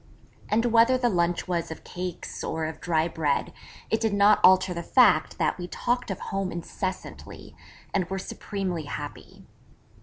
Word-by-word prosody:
And 225 +3 +2
whether 235 +2 +5
the 245 -1 +1
lunch 175 -3 0
was 170 -2 -1
of 160 - -8
cakes, 180 -1 -6
or 160 -1 -2
of 160 0 -6
dry 165 -2 +1
bread, 155 -4 -1 0.4
it 220 - +2
did 220 -3 +1
not 200 +1 +5
alter 185 0 +6
the 170 - -4
fact 170 -4 +4
that - - 0
we 175 - -5
talked 245 +6 -1
of 190 - -4
home 195 -2 -1
incessantly; 185 +2 -6 0.4
and 190 -2 +1
were 195 - -2
supremely 185 -3 -4
happy. - - -8
185 Hz, 160 wpm, -26 LUFS, 170-210 Hz, 0.4 s, alter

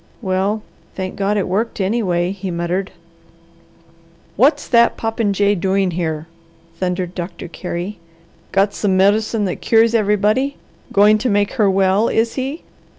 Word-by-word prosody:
"Well 195 +1 -1 0.3
thank 185 -1 -4
God 200 +1 0
it 200 - 0
worked, 215 +5 -2
anyway!" 190 -4 0
he 195 -1 -5
muttered. 175 +3 -2 1.4
"What's 270 - +3
that 235 -2 +4
popinjay 205 -3 +1
doing 190 0 0
here?" 160 -3 -3 0.5
thundered 180 0 -2
Doctor 175 -1 -6
Carey. 180 +3 -5 0.5
"Got 195 +1 +2
some 190 -3 0
medicine 210 +2 +2
that 180 - -4
cures 225 0 +3
everybody. 215 +5 +1 0.3
Going 210 +2 +5
to 245 +3 0
make 205 -1 +1
her 215 -6 +2
well, 195 +3 +2
is 225 +1 +1
he? 270 +5 -4
200 Hz, 135 wpm, -18 LUFS, 185-220 Hz, 1.4 s, Going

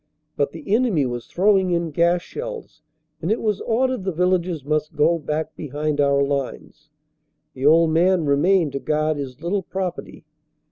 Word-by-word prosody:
But 140 -1 0
the 165 +6 -5
enemy 220 - +2
was 120 -1 -5
throwing 190 0 +2
in 170 -2 -1
gas 170 +3 +2
shells 465 - -8 0.4
and 170 - -1
it 220 - +1
was 210 -3 -1
ordered 255 -1 0
the 190 - -1
villagers 180 -3 0
must 150 +1 -1
go 165 +3 +3
back 155 +1 -3
behind 150 0 -2
our 140 0 +3
lines. 140 -2 -4 0.6
The 130 +2 0
old 165 +1 +5
man 175 +1 +3
remained 155 +3 +3
to 140 - -3
guard 155 +1 0
his 135 -1 -7
little 195 +4 0
property. 185 0 -5
165 Hz, 160 wpm, -22 LUFS, 145-190 Hz, 0.6 s, old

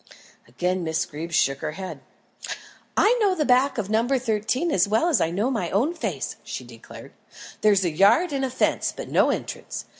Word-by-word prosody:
Again 180 +9 -2
Miss 160 -1 -1
Greeb 160 +3 -7
shook 135 -4 +2
her 155 -1 -4
head. 190 +2 -7 1.0
"I 450 +4 +5
know 395 -3 +3
the 305 -4 0
back 255 +2 +3
of 215 -4 -2
No. 220 +3 +1
13 255 +4 0
as 185 -5 +3
well 225 +12 +2
as 325 - +2
I 160 - +2
know 205 +10 -1
my 215 -9 -2
own 250 - +1
face," 340 - -4
she - - -6
declared. - - -13 0.5
"There's 200 -3 +4
a 170 - +1
yard 205 - +4
and 270 -1 -1
a 265 - 0
fence, 255 - 0
but - - -8
no - - +3
entrance. - - -4
215 Hz, 190 wpm, -24 LUFS, 180-270 Hz, 1.0 s, I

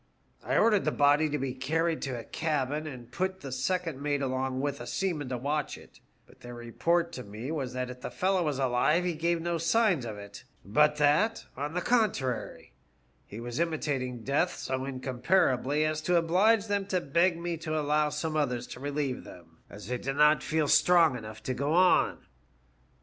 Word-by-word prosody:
I - - 0
ordered 210 -4 +4
the 155 - +1
body 145 +2 +3
to 150 - -1
be 135 -2 -3
carried 160 +5 -1
to 130 -3 -3
a - - -7
cabin, 150 0 -2
and 125 -4 -9
put 190 +5 -2
the 135 - -7
second 150 +3 -2
mate 145 -1 0
along 130 0 -1
with 140 +1 -2
a - - -7
seaman 165 -8 -2
to 125 - -2
watch 145 +3 -2
it; - - -17 0.3
but - - -21
their 120 0 -9
report 165 +9 0
to 125 - -7
me 110 +7 -7
was 135 -6 -3
that 125 0 -3
if 125 0 -12
the - - -4
fellow 190 0 +1
was 150 -4 -1
alive 135 +6 +2
he 175 - 0
gave 170 +2 0
no 170 -1 -1
signs 180 - +2
of 110 -3 -6
it, 100 0 -10 0.2
but 150 +9 +3
that, 150 +10 +2
on 145 +4 -4
the 180 - 0
contrary, 190 - -1 0.5
he 105 - -8
was 120 +2 -5
imitating 140 -7 -2
death 145 +8 +1
so 130 0 -3
incomparably 135 +2 +1
as 155 0 -1
to 180 +3 +1
oblige 195 +6 +3
them 200 -2 -1
to 185 -2 +1
beg 170 +3 +2
me 170 0 -3
to 155 -1 -2
allow 150 0 +1
some 155 +1 -3
others 125 -5 0
to - - -9
relieve 140 -1 -2
them, 80 -2 -14
as 105 - -10
they 125 +2 -3
did 135 +1 -3
not 150 +1 +5
feel 155 -1 0
strong 165 -1 +5
enough 110 -2 -8
to 130 - -2
go 140 +4 -1
on. 180 +1 +3
150 Hz, 195 wpm, -29 LUFS, 130-170 Hz, 0.5 s, not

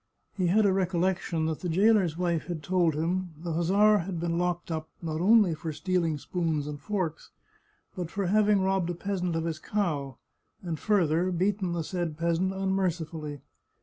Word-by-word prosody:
He 185 -3 +1
had 210 +5 +4
a - - +5
recollec 185 0 +1
tion 160 -2 -2
that 160 -1 -2
the 180 - -3
jailer's 190 -2 +3
wife 170 -3 -1
had 170 -4 -4
told 175 -1 +2
him 175 +2 -2
the 165 +1 -4
hussar 200 +6 +4
had 175 0 -4
been 170 0 -1
locked 175 -1 -1
up, 160 -1 -4
not 160 -1 -3
only 205 -2 +5
for 160 +1 -5
stealing 170 -1 0
spoons 160 -2 -2
and 145 -1 -6
forks, 180 -3 -3 0.7
but 180 -4 -4
for 195 +2 -2
having 205 +1 +3
robbed 190 -2 +1
a 175 - -2
peasant 180 -2 -2
of 165 0 -1
his 160 -2 -3
cow, 150 - -2 0.5
and 165 -4 -3
further 180 -4 +2
beaten 185 0 0
the 170 -1 -2
said 170 -2 -3
peasant 170 +3 +1
unmercifully. 170 -6 -2
175 Hz, 180 wpm, -28 LUFS, 160-190 Hz, 0.7 s, a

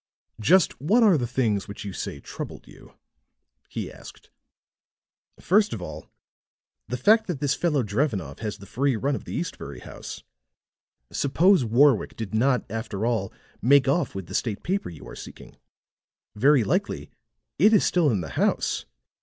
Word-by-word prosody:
"Just 165 - +3
what 215 - +4
are 205 -5 +6
the 125 -5 0
things 115 -5 0
which 100 0 -8
you 100 - -5
say - - -5
troubled - - -8
you?" - - -16 0.7
he - - -5
asked. - - -14 1.1
"First 205 +3 +3
of 115 - -4
all, - - -8 0.8
the 125 +4 -3
fact 220 - +4
that 175 -7 -3
this 145 -1 +1
fellow 150 -7 +1
Drevenoff 105 - -2
has 105 -3 -4
the 100 - -12
free 135 +4 0
run 135 +6 0
of - - -5
the - - -6
Eastbury 175 - -5
house. - - -9 0.9
Suppose 170 +4 +3
Warwick 120 +1 +3
did 110 -3 -6
not, 125 +1 +2
after 110 -1 -4
all, 115 -5 0 0.3
make 135 +2 +5
off 145 - +1
with 95 -2 -5
the - - -10
state 110 -5 -2
paper 195 +3 -1
you 85 - -11
are - - -9
seeking. - - -11 0.8
Very 135 +3 +4
likely 100 - -1 0.5
it 210 +7 +6
is 215 - +4
still 170 -4 +3
in 105 -7 +1
the 80 - -6
house. - - 0
130 Hz, 160 wpm, -25 LUFS, 110-160 Hz, 1.1 s, are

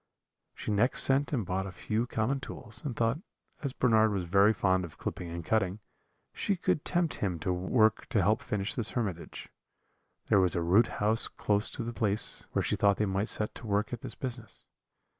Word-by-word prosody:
She - - -4
next 110 +5 +2
sent 135 +1 +2
and 120 -8 0
bought 95 +2 -2
a - - -6
few 110 +6 -2
common 120 +4 0
tools, 120 -3 -9
and 130 -5 -3
thought, 115 +5 +1 0.4
as 140 - -2
Bernard 110 -4 +3
was 95 -3 -1
very 100 +4 +5
fond 95 -3 +2
of 85 -3 -9
clipping 85 - -5
and 85 -1 -6
cutting, 100 -3 +1 0.6
she 200 - 0
could 165 -4 0
tempt 175 -2 0
him 95 -4 -1
to 90 +3 -1
work 110 +5 +2
to - - +1
help - - +3
finish 100 0 -2
this 115 - -2
hermitage. 100 -9 -4 0.8
There 100 - +4
was 90 -2 +2
a 85 - +1
root 100 +7 +5
house 110 +2 +1
close 105 +1 0
to 120 - -5
the 120 +1 -4
place, 105 -3 -1
where - - +1
she - - 0
thought 100 -1 +3
they 105 - +1
might 100 +2 -1
set 105 - -1
to - - -9
work 105 +3 0
at 120 - -4
this - - -7
business. 120 -6 -6
105 Hz, 200 wpm, -30 LUFS, 95-120 Hz, 0.8 s, very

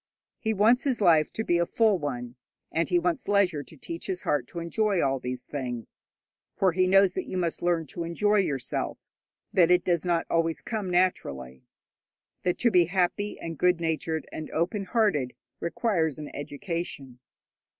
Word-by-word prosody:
He 220 - -1
wants 220 +4 +4
his 265 -4 0
life 165 -6 +4
to 220 - -2
be 175 -5 +2
a 170 - +2
full 220 -5 +3
one, 125 -5 -4 0.4
and 165 +1 0
he 180 - +3
wants 175 -1 -1
leisure 195 -7 +2
to 155 +3 -14
teach 165 +5 -6
his 185 -2 -3
heart 140 -5 0
to - - -11
enjoy 195 +4 0
all 135 -3 +1
these 125 0 -5
things; 125 -5 -6 0.5
for 190 -2 +3
he 185 +2 +2
knows 195 0 +5
that - - -4
you 185 - -4
must 170 -2 -1
learn 175 -2 +1
to 170 +4 -5
enjoy 205 +5 +1
yourself, 140 -10 -1 0.6
that 175 -3 +5
it 180 0 +4
does 175 -3 +1
not 175 -2 +1
always 165 -1 0
come 215 -5 -3
naturally, 70 - -1 0.7
that 180 - 0
to 235 - +3
be 180 -3 +5
happy 185 +3 -1
and 165 -2 -6
good 180 -1 +3
natured 160 -1 -2
and 155 - -6
open 190 +5 -1
hearted 180 - +1 0.2
requires 170 - 0
an 150 -1 -7
education. 145 -4 -5
170 Hz, 175 wpm, -27 LUFS, 155-190 Hz, 0.7 s, knows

